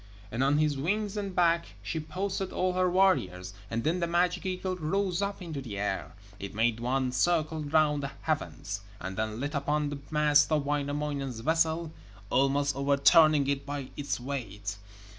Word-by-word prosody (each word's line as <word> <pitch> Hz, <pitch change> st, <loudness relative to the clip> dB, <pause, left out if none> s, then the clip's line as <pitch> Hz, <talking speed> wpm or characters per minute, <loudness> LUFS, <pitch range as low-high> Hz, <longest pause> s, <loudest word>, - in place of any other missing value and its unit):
And 120 Hz, +4 st, 0 dB
on 140 Hz, +2 st, +3 dB
his 150 Hz, -2 st, +1 dB
wings 205 Hz, +7 st, -1 dB
and 200 Hz, -3 st, -4 dB
back 170 Hz, -1 st, +2 dB
she 160 Hz, -, -3 dB
posted 190 Hz, +4 st, -3 dB
all 185 Hz, 0 st, 0 dB
her 185 Hz, 0 st, +2 dB
warriors, 95 Hz, -, +2 dB, 0.2 s
and 115 Hz, 0 st, -2 dB
then 165 Hz, +4 st, +1 dB
the 170 Hz, -, 0 dB
magic 175 Hz, +3 st, +1 dB
eagle 185 Hz, 0 st, -2 dB
rose 180 Hz, +2 st, -1 dB
up 200 Hz, -1 st, -3 dB
into 155 Hz, -5 st, -5 dB
the 110 Hz, -6 st, -6 dB
air. 95 Hz, -7 st, -3 dB, 0.2 s
It 100 Hz, 0 st, -7 dB
made 115 Hz, +1 st, +2 dB
one 130 Hz, +2 st, 0 dB
circle 155 Hz, +3 st, +1 dB
round 150 Hz, -1 st, +2 dB
the 140 Hz, 0 st, -4 dB
heavens, 105 Hz, -10 st, -3 dB, 0.2 s
and 95 Hz, +1 st, -5 dB
then 110 Hz, +2 st, -2 dB
lit 145 Hz, +3 st, -3 dB
upon 145 Hz, +1 st, 0 dB
the 145 Hz, -, -5 dB
mast 150 Hz, -1 st, +4 dB
of 150 Hz, -2 st, +2 dB
Wainamoinen's 145 Hz, -3 st, -2 dB
vessel, 160 Hz, +3 st, +1 dB, 0.4 s
almost 140 Hz, +1 st, +2 dB
overturning 140 Hz, +2 st, +5 dB
it 140 Hz, 0 st, 0 dB
by 140 Hz, -2 st, -5 dB
its 145 Hz, -3 st, -2 dB
weight. 105 Hz, -6 st, -5 dB
145 Hz, 170 wpm, -29 LUFS, 135-170 Hz, 0.4 s, overturning